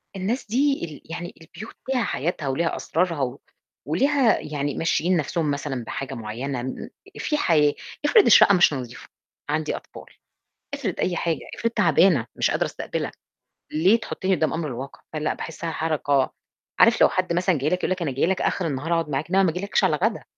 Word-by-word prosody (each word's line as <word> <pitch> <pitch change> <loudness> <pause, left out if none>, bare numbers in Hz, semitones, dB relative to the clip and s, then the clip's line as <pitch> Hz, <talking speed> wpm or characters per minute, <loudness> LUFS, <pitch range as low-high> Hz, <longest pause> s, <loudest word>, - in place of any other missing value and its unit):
الناس 205 +7 -2
دي 275 -2 +1
ال 155 +1 -12
يعني 175 +1 -5
البيوت 175 +7 -11
ليها 255 -3 +1
حياتها 150 -1 -2
وليها 165 +6 0
أسرارها 165 -2 -1
و 130 +1 -2 0.5
وليها 260 - +3
يعني 145 -1 -3
ممشيين 170 +2 +1
نفسهم 155 0 -1
مثلًا 140 -4 -3
بحاجة 135 +3 -5
معينة 120 +3 -4
م 130 - -6 0.3
في 300 - 0
حياة 150 - +3 0.3
افرض 415 +7 +6
الشقة 200 - +7
مش 175 -4 +5
نضيفة؟ 125 -3 -7 0.4
عندي 155 +1 -1
أطفال، - - -11 0.7
افرض - - -2
أي 180 - 0
حاجة، 165 -1 -1 0.2
افرض 230 - -1
تعبانة 175 - +4
مش - - +1
قادرة - - +1
أستقبلك. - - -4 0.6
ليه 185 +9 +4
تحُطّني 190 -4 -1
قدام 155 -3 +1
الأمر 160 +2 -3
الواقع؟ 130 +1 -7
فلأ، 155 -1 -1
باحسّها 165 +1 -5
حركة 145 -4 0 0.5
عارف - - +5
لو - - +7
حد 185 -2 -1
مثلًا 175 0 +2
جاي 140 +2 0
لك، 180 - +1
يقول - - -2
لك، 185 -1 -1
أنا 155 -5 -1
جاي 135 +4 +1
لك 185 +1 0
آخر 180 - 0
النهار 150 +3 -2
أقعد 165 -2 0
معاك. 140 +3 -2
إنما 195 +2 +4
ما 185 - +3
ييجيلكش 185 +5 -1
على - - +3
غدا. - - -1
165 Hz, 185 wpm, -24 LUFS, 140-185 Hz, 0.7 s, الشقة